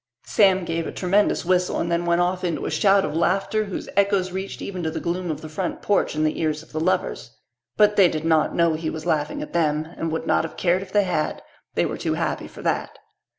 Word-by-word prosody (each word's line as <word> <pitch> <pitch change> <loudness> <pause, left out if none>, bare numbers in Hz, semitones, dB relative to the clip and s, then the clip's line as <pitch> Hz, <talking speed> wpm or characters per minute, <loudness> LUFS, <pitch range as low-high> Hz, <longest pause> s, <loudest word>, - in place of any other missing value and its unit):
Sam 190 -3 +3
gave 165 0 -2
a - - -4
tremendous 195 0 +1
whistle 180 0 +1
and 170 - -1
then 170 0 0
went 170 +1 +3
off 180 +1 0
into 170 -3 -2
a - - -2
shout 195 -1 +4
of 150 - -4
laughter 195 +5 +1
whose 195 - -5
echoes 200 -2 +2
reached 190 +1 -5
even 185 -2 -5
to 160 - -1
the 160 - -4
gloom 175 +1 -2
of 155 - -3
the 155 - -7
front 170 +3 -4
porch 205 -6 +1
and 155 0 +1
the 155 - -1
ears 155 -1 -1
of - - -20
the 155 - -3
lovers. 175 -8 -1 0.4
But 210 0 +4
they 195 -3 +7
did 160 -2 -3
not 160 -1 +2
know 170 -1 +3
he 155 0 -2
was 160 -1 -6
laughing 150 -1 -1
at - - -10
them 155 -2 +1
and 165 - -3
would 160 - -3
not - - +2
have 165 - -7
cared 180 +1 +2
if 190 -1 -9
they 205 0 +4
had. 165 -5 -2 0.3
They - - +2
were - - -4
too - - -1
happy - - -2
for - - -12
that. - - -1
175 Hz, 245 wpm, -23 LUFS, 160-190 Hz, 0.4 s, they